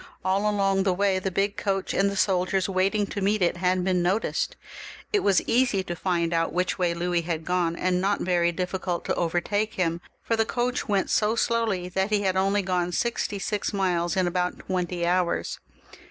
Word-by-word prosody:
All 195 +3 +2
along 195 -2 +1
the 190 -1 +1
way 195 0 +2
the 190 - -2
big 195 +2 -1
coach 195 -1 -1
and 200 +1 +2
the 200 - -4
soldiers 185 -1 +1
waiting 195 +2 +1
to 200 - -5
meet 200 0 +2
it 175 - +1
had 180 +1 +1
been 180 -1 +1
noticed. 220 - 0 0.6
It 415 - +4
was 200 - +3
easy 240 -5 +2
to 175 -2 -5
find 170 -1 0
out 165 0 +1
which 180 +2 -1
way 175 -2 +1
Louis 175 0 0
had 165 -1 -3
gone, 175 -2 0
and 180 +1 0
not 200 +1 +1
very 175 -1 +2
dif&cult 180 0 -3
to - - 0
catch 180 +5 -1
hiin 170 -2 +1
up, - - -17 0.2
for 230 - 0
the 225 - +3
coach 245 +2 -2
went 200 -3 0
so 215 +1 +2
slowly 230 -6 0
that 190 +2 -1
he 210 -1 +1
had 190 -1 +1
only 195 +2 +2
gone 180 -1 0
sixty 210 +1 -1
six 210 +2 -2
miles 180 -2 0
in 185 - +3
about 180 0 -1
twenty 180 -2 -2
hours. 180 0 0
185 Hz, 200 wpm, -26 LUFS, 180-200 Hz, 0.6 s, It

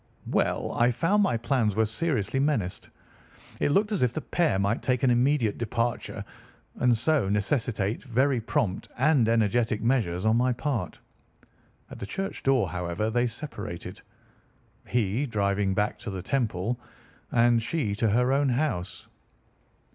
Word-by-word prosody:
"Well, - - 0
I 120 +1 +3
found 165 - +2
my 155 - +2
plans 115 -3 0
very 110 0 +3
seriously 130 0 -1
menaced. 135 -11 -1 0.7
It - - +1
looked 205 +8 +2
as 205 - 0
if 125 -2 +2
the 155 - -2
pair 170 - +1
might 100 +3 0
take 125 -1 0
an 130 - +4
immediate 120 -2 +2
departure, 115 0 -2 0.5
and 125 -2 +3
so 140 -4 +1
necessitate 105 0 0
very 130 0 +1
prompt 105 -3 -1
and 135 -4 +3
energetic 115 0 +2
measures 110 -8 0
on 110 +1 +4
my 125 +1 +2
part. 120 - -3 0.9
At - - -9
the 100 - -5
church 195 - -4
door, 130 -7 +2
however, 90 +5 -2
they 120 +1 +2
separated, 115 - -7 0.9
he 120 +4 0
driving 100 -3 0
back 105 +1 0
to - - -6
the 95 -2 -5
Temple, 115 -1 -1 0.5
and 120 -1 +4
she 115 -4 -1
to 110 0 +2
her 125 +5 +2
own 140 0 +2
house. 125 - -2
120 Hz, 145 wpm, -27 LUFS, 105-135 Hz, 0.9 s, an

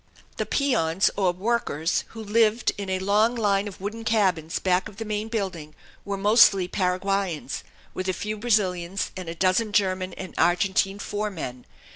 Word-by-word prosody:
The - - -2
peons, 190 - +2
or 190 -3 +2
workers, 185 -5 -1
who 225 -1 -9
lived 220 +2 +2
in 200 -1 -5
a 190 - 0
long 210 +5 +2
line 205 -3 +1
of 200 - -9
wooden 215 +4 -5
cabins 190 -8 +1
back 185 +3 +1
of 205 - -16
the 225 - -5
main 210 0 -2
building, 185 -9 -4 0.3
were 200 -1 -3
mostly 200 -2 +5
Paraguayans, 185 -4 -1 0.3
with 185 - -4
a - - +1
few 210 +4 -4
Brazilians, 195 -5 0
and 185 -3 -6
a 165 - -5
dozen 190 +5 +1
German 185 -3 +1
and 185 -2 -8
Argentine 195 +2 +2
foremen. 195 -13 -5
195 Hz, 160 wpm, -25 LUFS, 185-215 Hz, 0.3 s, mostly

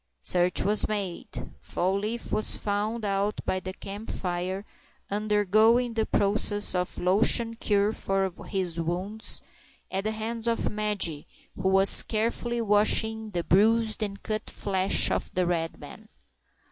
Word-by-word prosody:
Search 180 0 +2
was 210 +1 +2
made. 200 -5 -4
Fall 185 +2 -1
leaf 220 +3 -4
was 215 - +2
found 210 +2 -2
out 200 +1 -1
by 185 - 0
the 185 0 -6
camp 200 +3 -8
fire, 185 +2 -3 0.5
undergoing 215 +3 +2
the 220 -1 -1
process 205 0 +1
of 180 -1 -2
the - - -7
lotion 225 +5 +3
cure 210 -2 +1
for 195 -2 -1 0.2
his 180 -4 -3
wounds, 185 +6 0 0.5
at 195 +2 -2
the 215 - 0
hands 225 +1 -3
of 230 0 0
Madge, 205 -8 0 0.3
who 190 - -1
was 195 +1 +7
carefully 235 +2 -1
washing 220 +1 +2
the 175 -4 -3
bruised 220 +5 +3
and 200 -2 -4
cut 215 0 -3
flesh 190 -1 +1
of - - -1
the 180 0 +2
red 165 -2 -2
man. - - -12
205 Hz, 145 wpm, -27 LUFS, 190-220 Hz, 0.5 s, was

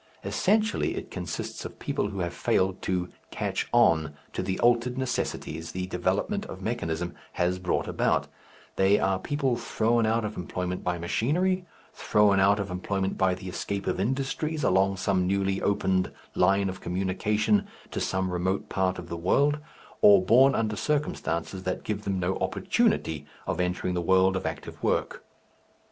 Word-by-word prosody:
Essentially 215 +1 +1
it - - -6
consists 85 -3 -5
of - - -8
people - - -1
who 100 - -4
have 85 0 -2
failed 95 +1 +1
to 90 -1 -1 0.2
"catch - - -2
on" 80 -10 +3 0.2
to - - -2
the 95 - -2
altered 120 +1 +3
necessities 80 -10 -3
the 90 0 -2
development 95 - -1
of - - -8
mechanism 85 +1 -2 0.2
has 90 +1 0
brought 90 -1 -1
about, - - +1 0.5
they 95 +2 +5
are 95 -1 +1
people 135 +1 0
thrown 115 -1 +1
out 115 0 +1
of 105 0 -5
employment 90 +1 -3
by 90 -1 -1
machinery, 175 - 0 0.3
thrown 105 -2 +3
out 100 +2 +4
of 100 -2 -3
employment 95 +1 -2
by 95 -1 +2
the 95 +1 -9
escape 100 +2 -3
of - - -1
industries 135 +7 -1
along 95 -2 +3
some 95 -1 +1
newly 95 0 0
opened 95 -2 +1 0.2
line 100 +2 +3
of 95 0 -5
communication 105 - +1 0.2
to - - -3
some 95 -1 -1
remote 95 +2 -1
part 95 -1 0
of 85 - -7
the 85 - -4
world, 140 - +2 0.4
or 100 -2 +7
born 130 +6 +6
under 110 -1 0
circumstances 100 - -2
that 95 0 -3
give 105 0 -3
them 95 -1 -1
no 90 +1 0
opportunity 75 -2 0 0.2
of - - -2
entering 90 0 -1
the 90 - -1
world 95 +2 +4
of 95 - -2
active - - -7
work. - - -1
95 Hz, 160 wpm, -27 LUFS, 90-110 Hz, 0.5 s, or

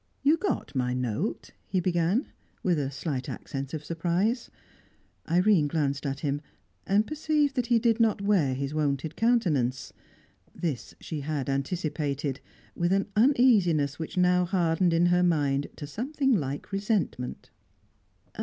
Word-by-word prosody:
"You 290 +3 +5
got 380 +5 -2
my 125 -2 0
note?" 125 - -2 0.2
he 190 - 0
began, 180 - +1 0.4
with 175 -4 +2
a 135 -2 -1
slight 135 -1 -4
accent 135 0 -5
of 155 -2 -5
surprise. 175 - 0 0.8
Irene 180 -2 +4
glanced 145 -2 -1
at 135 +1 -4
him, 145 -1 -1 0.5
and 205 +2 +3
perceived 300 -1 0
that 250 -2 0
he 240 -1 +4
did 230 0 +2
not 225 -3 +3
wear 190 -10 +2
his 140 +2 -3
wonted 150 0 -1
countenance. 145 - +1 0.6
This 155 -8 -4
she 155 - -5
had 145 -1 -3
anticipated, 145 -2 -2 0.3
with 175 +1 0
an 195 +1 +1
uneasiness 210 - +4
which 165 +4 -6
now 180 0 +4
hardened 175 -1 +1
in 165 +1 +3
her 175 0 +4
mind 145 -5 +1
to 145 - -7
something 265 - 0
like 145 - -2
resentment. 195 - -2
170 Hz, 140 wpm, -27 LUFS, 140-205 Hz, 0.8 s, You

